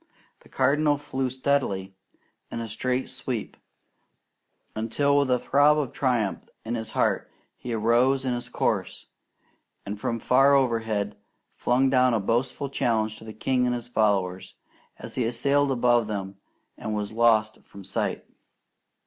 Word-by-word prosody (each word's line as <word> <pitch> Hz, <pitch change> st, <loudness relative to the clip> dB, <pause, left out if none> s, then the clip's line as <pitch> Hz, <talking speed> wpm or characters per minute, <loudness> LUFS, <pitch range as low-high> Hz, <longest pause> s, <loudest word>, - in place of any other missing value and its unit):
The -, -, -21 dB
Cardinal 145 Hz, +3 st, +2 dB
flew 135 Hz, -3 st, -3 dB
steadily 125 Hz, -8 st, -1 dB, 0.6 s
in -, -, -5 dB
a 115 Hz, -, -4 dB
straight 125 Hz, +4 st, -1 dB
sweep, 125 Hz, -3 st, -4 dB, 1.2 s
until 130 Hz, +6 st, +1 dB
with 140 Hz, -2 st, +3 dB
a 125 Hz, -, +4 dB
throb 145 Hz, +4 st, +4 dB
of 145 Hz, -4 st, -2 dB
triumph 120 Hz, -7 st, -1 dB, 0.2 s
in 115 Hz, -, -3 dB
his 110 Hz, -2 st, -4 dB
heart, -, -, 0 dB, 0.3 s
he 125 Hz, -, -7 dB
arose 120 Hz, +4 st, +2 dB
in 125 Hz, -, 0 dB
his 120 Hz, 0 st, -4 dB
course, -, -, -2 dB, 0.8 s
and 100 Hz, +1 st, -5 dB
from 115 Hz, +2 st, -2 dB
far 135 Hz, +4 st, +4 dB
overhead, 110 Hz, -5 st, 0 dB, 0.4 s
flung 130 Hz, +2 st, +1 dB
down 125 Hz, -2 st, +4 dB
a -, -, +1 dB
boastful 125 Hz, +6 st, -1 dB
challenge 110 Hz, -5 st, 0 dB
to -, -, -12 dB
the 110 Hz, -, -7 dB
king 125 Hz, +3 st, 0 dB
and 125 Hz, -, 0 dB
his 120 Hz, 0 st, -7 dB
followers, 100 Hz, -5 st, 0 dB, 0.4 s
as -, -, -9 dB
he 120 Hz, -3 st, 0 dB
sailed 140 Hz, +4 st, +1 dB
above 120 Hz, -3 st, +2 dB
them 100 Hz, -2 st, -5 dB, 0.4 s
and 110 Hz, -, -3 dB
was 105 Hz, 0 st, -3 dB
lost 110 Hz, -2 st, +2 dB
from 100 Hz, -, -13 dB
sight. -, -, -2 dB
120 Hz, 150 wpm, -26 LUFS, 110-130 Hz, 1.2 s, a